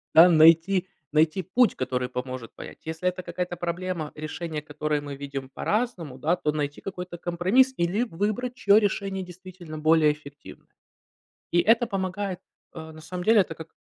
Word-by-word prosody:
да, 165 Hz, +2 st, +10 dB
найти 165 Hz, +3 st, +5 dB, 0.3 s
найти 155 Hz, +4 st, +3 dB
путь, 235 Hz, +7 st, +2 dB
который 125 Hz, -1 st, -2 dB
поможет 125 Hz, -2 st, -6 dB
понять. -, -, -10 dB
Если 160 Hz, +3 st, -1 dB
это 180 Hz, 0 st, -6 dB
какая-то 175 Hz, 0 st, -4 dB
проблема, 175 Hz, -2 st, -3 dB
решение 155 Hz, +1 st, -5 dB
которой 150 Hz, 0 st, -2 dB
мы 145 Hz, -1 st, -7 dB
видим 140 Hz, -1 st, -6 dB
по-разному, 180 Hz, -, -2 dB
да, 160 Hz, +6 st, +1 dB
то 150 Hz, -, -1 dB
найти 145 Hz, -1 st, -3 dB
какой-то 180 Hz, -2 st, -6 dB
компромисс 185 Hz, +11 st, +2 dB
или 175 Hz, +7 st, +1 dB
выбрать, 215 Hz, +5 st, -2 dB
чье 205 Hz, -4 st, +5 dB
решение 195 Hz, -2 st, -1 dB
действительно 180 Hz, -2 st, -10 dB
более 155 Hz, -1 st, +4 dB
эффективное. 145 Hz, -1 st, -14 dB, 0.8 s
И 175 Hz, -, +3 dB
это 230 Hz, +5 st, +3 dB
помогает, 190 Hz, -2 st, -3 dB, 0.3 s
э, 160 Hz, -1 st, -8 dB
на 155 Hz, 0 st, -12 dB
самом 180 Hz, +3 st, -6 dB
деле, 225 Hz, 0 st, +6 dB
это 170 Hz, -, -4 dB
как 160 Hz, 0 st, -10 dB
170 Hz, 160 wpm, -26 LUFS, 155-190 Hz, 0.8 s, да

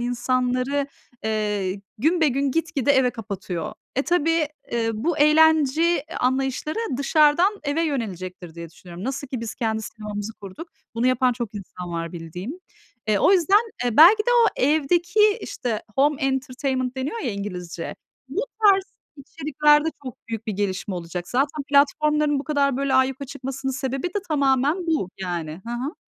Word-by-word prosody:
insanları, 255 Hz, +3 st, 0 dB, 0.4 s
eee, 210 Hz, -3 st, -1 dB, 0.2 s
günbegün 285 Hz, -2 st, +2 dB
gitgide 295 Hz, -3 st, +1 dB
eve 260 Hz, -2 st, +3 dB
kapatıyor. 195 Hz, -6 st, -5 dB, 0.2 s
Eee, 270 Hz, -, +2 dB
tabii, 330 Hz, -2 st, +1 dB, 0.3 s
ııı, 225 Hz, -1 st, +1 dB
bu 330 Hz, -2 st, 0 dB
eğlence 315 Hz, +1 st, +4 dB, 0.2 s
anlayışları 265 Hz, -, 0 dB, 0.2 s
dışarıdan 310 Hz, +8 st, +3 dB
eve 295 Hz, +3 st, 0 dB
yönelecektir, 185 Hz, -, -4 dB
diye 170 Hz, -1 st, -8 dB
düşünüyorum. 175 Hz, +3 st, -11 dB
Nasıl 275 Hz, +2 st, -3 dB
ki 255 Hz, -2 st, -5 dB
biz 230 Hz, -, -5 dB
kendi 220 Hz, -1 st, -2 dB
sinemamızı 210 Hz, 0 st, -6 dB
kurduk, 205 Hz, -, -10 dB, 0.3 s
bunu 230 Hz, +2 st, +1 dB
yapan 255 Hz, 0 st, +3 dB
çok 235 Hz, -3 st, -5 dB
insan 180 Hz, -3 st, -7 dB
var 165 Hz, 0 st, -4 dB
bildiğim. 175 Hz, -, -6 dB, 0.6 s
Eee, 210 Hz, -2 st, +3 dB
o 380 Hz, -, +5 dB
yüzden, 400 Hz, +5 st, +3 dB
eee, 240 Hz, -2 st, -1 dB
belki 385 Hz, +8 st, +8 dB
de 485 Hz, -, 0 dB
o 475 Hz, -1 st, +5 dB, 0.2 s
evdeki, 345 Hz, -, +3 dB
işte, 225 Hz, -4 st, -3 dB
home 285 Hz, +1 st, +2 dB
entertainment 265 Hz, -1 st, -1 dB
deniyor 285 Hz, -, -3 dB
ya 250 Hz, -, -2 dB
İngilizce, 180 Hz, -4 st, -6 dB, 0.3 s
bu 360 Hz, -, -2 dB, 0.2 s
tarz 390 Hz, -2 st, +6 dB, 0.3 s
içeriklerde 295 Hz, +1 st, +2 dB, 0.2 s
çok 255 Hz, -, -6 dB
büyük 225 Hz, 0 st, -5 dB
bir 215 Hz, -, -1 dB
gelişme 195 Hz, -1 st, -2 dB
olacak. 175 Hz, 0 st, -5 dB
Zaten 280 Hz, +3 st, 0 dB
platformların 295 Hz, +1 st, +3 dB
bu 275 Hz, -, -5 dB
kadar, 280 Hz, -4 st, +1 dB
böyle, 275 Hz, -1 st, 0 dB
ayyuka 260 Hz, +1 st, +2 dB
çıkmasının 270 Hz, 0 st, -4 dB
sebebi 265 Hz, +4 st, -2 dB
de 385 Hz, +4 st, -2 dB
tamamen 285 Hz, +3 st, +1 dB
bu, 315 Hz, -, 0 dB
yani. 170 Hz, -2 st, -4 dB
Hı 235 Hz, -, -5 dB
hı. 260 Hz, +8 st, -3 dB
265 Hz, 150 wpm, -23 LUFS, 215-300 Hz, 0.6 s, belki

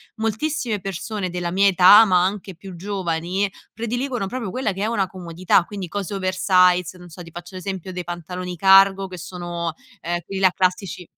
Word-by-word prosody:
moltissime 225 Hz, 0 st, -2 dB
persone 195 Hz, +1 st, -4 dB
della 175 Hz, -1 st, -3 dB
mia 200 Hz, +2 st, +4 dB
età, 195 Hz, +4 st, +8 dB
ma 180 Hz, -3 st, +3 dB
anche 190 Hz, -1 st, -3 dB
più 185 Hz, +1 st, -11 dB
giovani, 185 Hz, 0 st, -2 dB, 0.2 s
prediligono 240 Hz, 0 st, -3 dB
proprio 230 Hz, -4 st, -5 dB
quella 255 Hz, -5 st, -1 dB
che 195 Hz, +2 st, -4 dB
è -, -, +1 dB
una 205 Hz, -4 st, 0 dB
comodità 175 Hz, -1 st, 0 dB
quindi 195 Hz, -4 st, -7 dB
cose 205 Hz, +1 st, -4 dB
oversize 185 Hz, -2 st, +2 dB
non 175 Hz, -1 st, -13 dB
so 170 Hz, +2 st, -11 dB
ti 165 Hz, -, -13 dB
faccio 175 Hz, +2 st, -10 dB
l'esempio 190 Hz, -1 st, -5 dB
dei 180 Hz, 0 st, -5 dB
pantaloni 180 Hz, +1 st, -6 dB
cargo 195 Hz, +1 st, +5 dB
che 180 Hz, -, -8 dB
sono 175 Hz, -1 st, -5 dB, 0.3 s
ehm 175 Hz, +1 st, -2 dB
quelli 195 Hz, -1 st, -5 dB
là 185 Hz, -1 st, +5 dB
classici 185 Hz, -1 st, -1 dB
185 Hz, 175 wpm, -22 LUFS, 180-200 Hz, 0.3 s, età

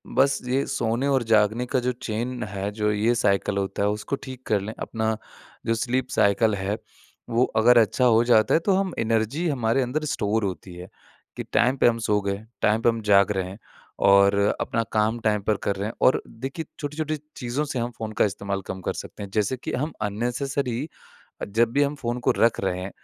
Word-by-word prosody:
बस 135 Hz, +1 st, +3 dB
ये 130 Hz, +2 st, +1 dB
सोने 120 Hz, 0 st, -1 dB
और 135 Hz, -3 st, +2 dB
जागने 110 Hz, +3 st, +3 dB
का 130 Hz, +1 st, 0 dB
जो 125 Hz, +1 st, 0 dB
चेन 120 Hz, +3 st, -3 dB
है 100 Hz, 0 st, -4 dB
जो 105 Hz, 0 st, 0 dB
ये 105 Hz, +3 st, +2 dB
साइकल 100 Hz, -3 st, +1 dB
होता 100 Hz, 0 st, -1 dB
है 105 Hz, -, +3 dB
उसको 105 Hz, +6 st, -2 dB
ठीक 130 Hz, -1 st, -9 dB
कर 105 Hz, -2 st, +2 dB
लें। 110 Hz, +2 st, -5 dB
अपना 110 Hz, -1 st, -2 dB, 0.5 s
जो 115 Hz, -, +2 dB
स्लीप 125 Hz, +2 st, -1 dB
साइकिल 105 Hz, +1 st, +3 dB
है 100 Hz, +2 st, -2 dB, 0.5 s
वो 120 Hz, +1 st, +3 dB
अगर 120 Hz, +2 st, +6 dB
अच्छा 115 Hz, +3 st, +3 dB
हो 115 Hz, -1 st, +5 dB
जाता 110 Hz, -3 st, +4 dB
है -, -, +5 dB
तो 200 Hz, -, +4 dB
हम 190 Hz, -2 st, 0 dB
एनर्जी 115 Hz, +9 st, 0 dB
हमारे 130 Hz, -3 st, +1 dB
अंदर 145 Hz, +5 st, -2 dB
स्टोर 110 Hz, -5 st, 0 dB
होती 95 Hz, -1 st, -4 dB
है, 90 Hz, +1 st, -9 dB, 0.5 s
कि -, -, -4 dB
टाइम 130 Hz, +3 st, +3 dB
पे -, -, +4 dB
हम 115 Hz, -, +3 dB
सो 105 Hz, -1 st, +2 dB
गए 100 Hz, +1 st, -3 dB, 0.2 s
टाइम 110 Hz, +2 st, +3 dB
पे 120 Hz, -, +4 dB
हम 115 Hz, 0 st, -1 dB
जाग 100 Hz, 0 st, +5 dB
रहे 95 Hz, -2 st, -2 dB
हैं 95 Hz, -, -9 dB, 0.5 s
और 100 Hz, 0 st, +6 dB, 0.2 s
अपना 115 Hz, 0 st, -1 dB
काम 110 Hz, +2 st, +1 dB
टाइम 105 Hz, -2 st, +1 dB
पर 105 Hz, -1 st, +1 dB
कर 100 Hz, -, 0 dB
रहे 100 Hz, +2 st, -3 dB
हैं। 115 Hz, -, -5 dB
और 130 Hz, -, +4 dB
देखिए 135 Hz, +7 st, -6 dB
छोटी-छोटी 155 Hz, +1 st, -3 dB, 0.2 s
चीज़ों 125 Hz, +4 st, -2 dB
से 135 Hz, -3 st, -3 dB
हम 120 Hz, +1 st, -2 dB
फ़ोन 110 Hz, -1 st, -4 dB
का -, -, +7 dB
इस्तेमाल 100 Hz, -1 st, -3 dB
कम 95 Hz, -, -5 dB
कर -, -, -2 dB
सकते -, -, -8 dB
हैं। 100 Hz, -, -7 dB
जैसे 110 Hz, +4 st, 0 dB
कि -, -, -6 dB
हम 150 Hz, +5 st, -1 dB
अननेसेसरी 125 Hz, +4 st, -2 dB, 0.6 s
अ, -, -, 0 dB
जब 115 Hz, +3 st, +1 dB
भी 145 Hz, -, +3 dB
हम 145 Hz, +1 st, +1 dB
फ़ोन 120 Hz, -3 st, -3 dB
को -, -, +7 dB
रख 115 Hz, 0 st, +3 dB
रहे 90 Hz, -1 st, -1 dB
हैं 95 Hz, -, -5 dB
115 Hz, 215 wpm, -24 LUFS, 105-125 Hz, 0.6 s, का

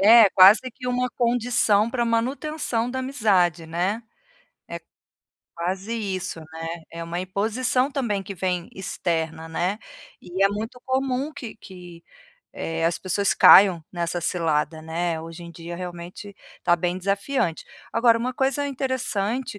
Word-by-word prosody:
É, 220 Hz, +1 st, +8 dB
quase 195 Hz, +3 st, +8 dB
que 250 Hz, +1 st, -9 dB
uma 250 Hz, 0 st, 0 dB
condição 235 Hz, -3 st, +2 dB
pra 240 Hz, -1 st, 0 dB
manutenção 245 Hz, +1 st, -1 dB
da 260 Hz, -, -3 dB
amizade, 200 Hz, -, +1 dB
né, 180 Hz, +7 st, -2 dB, 0.7 s
é -, -, -6 dB, 0.8 s
quase 190 Hz, +6 st, -3 dB
isso, 190 Hz, -6 st, -3 dB
né, 160 Hz, +1 st, -8 dB, 0.2 s
é 165 Hz, 0 st, -6 dB
uma 170 Hz, +1 st, -4 dB
imposição 230 Hz, +8 st, 0 dB
também 215 Hz, -8 st, -1 dB
que 200 Hz, -, -7 dB
vem 180 Hz, -1 st, -2 dB
externa, 165 Hz, -3 st, -3 dB
né, 180 Hz, +6 st, -1 dB, 0.4 s
e 185 Hz, +2 st, -3 dB
é 195 Hz, -, +6 dB
muito 220 Hz, +5 st, -5 dB
comum 265 Hz, +2 st, -1 dB
que 255 Hz, -7 st, -8 dB
que, 175 Hz, -4 st, -12 dB, 0.5 s
eh, 165 Hz, 0 st, -3 dB
as 165 Hz, 0 st, +1 dB
pessoas 195 Hz, +2 st, 0 dB
caiam 180 Hz, -5 st, +7 dB
nessa 175 Hz, 0 st, -2 dB
cilada, 160 Hz, -2 st, -1 dB
né, 165 Hz, +1 st, -2 dB
hoje 165 Hz, +1 st, -9 dB
em 170 Hz, -, -9 dB
dia 170 Hz, +1 st, -8 dB
realmente, 180 Hz, +3 st, -8 dB, 0.3 s
tá 175 Hz, -1 st, +4 dB
bem 175 Hz, +1 st, -1 dB
desafiante. 200 Hz, -, -1 dB, 0.3 s
Agora 230 Hz, 0 st, +4 dB
uma 250 Hz, +2 st, -2 dB
coisa 270 Hz, +3 st, 0 dB
interessante 255 Hz, -3 st, -2 dB
195 Hz, 140 wpm, -24 LUFS, 170-240 Hz, 0.8 s, É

